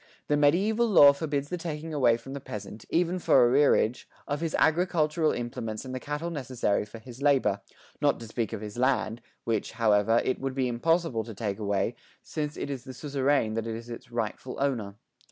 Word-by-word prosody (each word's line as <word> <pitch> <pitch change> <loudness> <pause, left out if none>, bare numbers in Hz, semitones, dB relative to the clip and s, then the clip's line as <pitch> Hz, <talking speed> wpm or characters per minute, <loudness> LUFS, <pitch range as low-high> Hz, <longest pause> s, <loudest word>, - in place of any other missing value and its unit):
The 150 - +4
mediæval 200 +11 +3
law 145 -8 +8
forbids 145 -1 -2
the 180 - -3
taking 160 -1 -5
away 125 -5 +4
from 135 +3 -10
the 140 - -4
peasant, 105 -4 -8
even 175 +2 +1
for 130 -7 +5
arrearage, 125 -2 +3 0.2
of 145 +2 -2
his 165 -1 -1
agricultural 160 -1 +2
implements 115 -1 -4
and 130 - -6
the 130 - -3
cattle 150 +5 -4
necessary 125 -9 -1
for 115 - -10
his 120 +3 -12
labour, 140 -2 +2 0.4
not - - +2
to - - -6
speak 115 -1 -2
of 110 -2 -5
his 105 +2 -7
land, 125 -3 +1 0.2
which, 110 -2 -1
however, 110 0 +3
it 130 - 0
would 135 -1 -3
be 130 -2 +1
impossible 135 0 +1
to 115 -2 -9
take 100 -1 -3
away, 100 +1 0 0.3
since 150 -1 -4
it 140 - -4
is 130 -3 -5
the 130 -1 -9
suzerain 140 -5 0
that 115 0 -2
is 115 +1 -6
its 120 +1 -9
rightful 120 +2 -4
owner. 115 -8 -1
130 Hz, 190 wpm, -28 LUFS, 115-150 Hz, 0.4 s, law